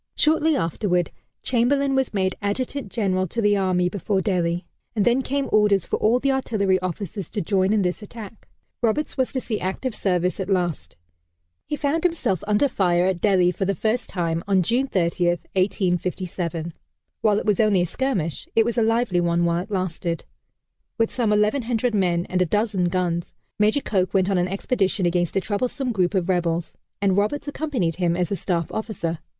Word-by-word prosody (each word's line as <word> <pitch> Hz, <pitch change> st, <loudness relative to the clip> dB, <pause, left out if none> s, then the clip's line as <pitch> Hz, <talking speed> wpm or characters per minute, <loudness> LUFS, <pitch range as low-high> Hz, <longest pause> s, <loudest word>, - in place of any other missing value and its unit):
Shortly 315 Hz, 0 st, +3 dB
afterward, 180 Hz, -, 0 dB, 0.3 s
Chamberlain 270 Hz, +3 st, +2 dB
was 265 Hz, -1 st, +1 dB
made 190 Hz, -2 st, 0 dB
Adjutant 225 Hz, +2 st, -3 dB
General 190 Hz, -4 st, 0 dB
to 230 Hz, -, -4 dB
the 205 Hz, -2 st, +3 dB
Army 185 Hz, -2 st, +1 dB
before 195 Hz, +1 st, -1 dB
Delhi, 175 Hz, -3 st, 0 dB, 0.3 s
and 210 Hz, -, +2 dB
then 245 Hz, +2 st, +3 dB
came 275 Hz, +1 st, -1 dB
orders 205 Hz, -4 st, +3 dB
for -, -, -1 dB
all 225 Hz, +3 st, +3 dB
the 275 Hz, +1 st, +1 dB
artillery 200 Hz, -8 st, +1 dB
officers 185 Hz, 0 st, -5 dB
to 215 Hz, -, -3 dB
join 190 Hz, +1 st, +1 dB
in 215 Hz, -2 st, +2 dB
this 180 Hz, +3 st, -1 dB
attack. 215 Hz, 0 st, -10 dB, 0.3 s
Roberts 240 Hz, +6 st, 0 dB
was 260 Hz, -2 st, 0 dB
to 260 Hz, -, -1 dB
see 225 Hz, -4 st, -3 dB
active 195 Hz, +7 st, -3 dB
service 180 Hz, -2 st, 0 dB
at 190 Hz, 0 st, -3 dB
last. 175 Hz, -, -1 dB, 0.7 s
He 300 Hz, -, -1 dB
found 295 Hz, +3 st, 0 dB
himself 265 Hz, -, 0 dB
under 210 Hz, +7 st, +3 dB
fire 180 Hz, -7 st, +2 dB
at 185 Hz, -2 st, 0 dB
Delhi 185 Hz, -4 st, +4 dB
for 190 Hz, -, -2 dB
the 195 Hz, +1 st, 0 dB
first 220 Hz, +7 st, -1 dB
time 170 Hz, -2 st, -1 dB
on 190 Hz, -2 st, +3 dB
June 245 Hz, +9 st, +1 dB
30, 175 Hz, -4 st, +1 dB
1857. 175 Hz, -2 st, -1 dB, 0.5 s
While 210 Hz, -2 st, +3 dB
it -, -, -2 dB
was 210 Hz, -1 st, +2 dB
only 210 Hz, -4 st, +4 dB
a -, -, +2 dB
skirmish 185 Hz, -, -2 dB
it 225 Hz, -, +5 dB
was 235 Hz, +1 st, 0 dB
a -, -, +3 dB
lively 225 Hz, -5 st, +2 dB
one 170 Hz, 0 st, +1 dB
while 170 Hz, 0 st, +1 dB
it 185 Hz, -, -6 dB
lasted. 180 Hz, -3 st, -2 dB, 0.7 s
With 225 Hz, -1 st, +1 dB
some 235 Hz, -4 st, +1 dB
1,100 225 Hz, +3 st, +1 dB
men 175 Hz, -4 st, +1 dB
and 185 Hz, 0 st, 0 dB
a -, -, +4 dB
dozen 205 Hz, -1 st, +1 dB
guns, 175 Hz, -1 st, -1 dB, 0.2 s
Major 215 Hz, +7 st, +3 dB
Coke 190 Hz, -5 st, 0 dB
went 190 Hz, +1 st, +3 dB
on 190 Hz, -, +2 dB
an 175 Hz, -, +1 dB
expedition 195 Hz, 0 st, 0 dB
against 175 Hz, -1 st, 0 dB
a 195 Hz, -, +2 dB
troublesome 250 Hz, +6 st, -2 dB
group 190 Hz, -2 st, +1 dB
of 180 Hz, -2 st, +1 dB
rebels, 175 Hz, -2 st, 0 dB, 0.3 s
and 195 Hz, -2 st, +3 dB
Roberts 215 Hz, +10 st, 0 dB
accompanied 275 Hz, -, -2 dB
him 175 Hz, -2 st, +1 dB
as 180 Hz, 0 st, -1 dB
a -, -, +1 dB
staff 170 Hz, -4 st, -2 dB
officer. 200 Hz, -7 st, -3 dB
195 Hz, 185 wpm, -23 LUFS, 180-225 Hz, 0.7 s, it